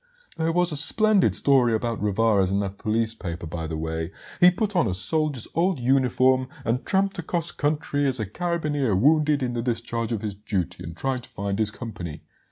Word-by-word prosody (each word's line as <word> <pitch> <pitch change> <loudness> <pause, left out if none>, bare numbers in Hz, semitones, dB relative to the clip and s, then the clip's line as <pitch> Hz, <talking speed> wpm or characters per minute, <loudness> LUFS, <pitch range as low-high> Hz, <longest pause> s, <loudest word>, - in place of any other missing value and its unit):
"There 165 0 0
was 175 +1 +2
a - - -2
splendid 210 +6 +4
story 125 -5 +4
about 115 -1 -2
Rivarez 105 -2 +2
and 100 +1 0
that 100 0 -6
police 110 +1 0
paper, 85 -5 -6
by 80 0 -5
the 80 0 -4
way. 80 +1 -3 0.3
He 180 -1 +8
put 205 +3 -2
on 170 -9 +3
a 90 - -1
soldier's 150 - -1
old 175 -1 +1
uniform 130 0 +2 0.2
and 120 +3 0
tramped 195 0 +1
across 170 0 -2
country 145 -1 -1
as 130 -2 +1
a 110 - -1
carabineer 150 - -1
wounded 150 +5 +3
in 125 -1 -2
the 120 - -2
discharge 115 -1 -2
of 110 -3 -2
his 105 -2 -3
duty 100 -3 -3
and 85 +1 -8
trying 135 -1 -1
to 125 - -12
find 100 +1 -3
his 110 -1 +2
company. 105 -9 -7
120 Hz, 195 wpm, -24 LUFS, 105-155 Hz, 0.3 s, He